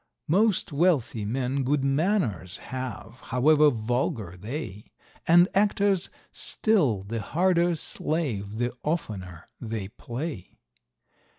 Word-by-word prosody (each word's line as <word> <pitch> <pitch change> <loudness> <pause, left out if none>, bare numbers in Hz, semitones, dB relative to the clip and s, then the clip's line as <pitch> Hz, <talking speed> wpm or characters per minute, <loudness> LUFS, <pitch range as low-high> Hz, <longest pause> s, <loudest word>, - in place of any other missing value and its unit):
Most 200 +2 +2
wealthy 140 - +1
men 130 +4 -1
good 135 +1 +1
manors 135 - 0
have, 130 -2 -7
however 150 +4 +5
vulgar 115 - -2
they; 105 - -6 0.4
And 175 +2 +7
actors 200 -2 +2 0.2
still 145 - +1
the 110 +3 -4
harder 175 - +2
slave 125 -11 -2
the 120 +1 -1
oftener 95 - -3 0.2
they 110 -5 -4
play. 125 - -6
130 Hz, 100 wpm, -27 LUFS, 110-170 Hz, 0.4 s, And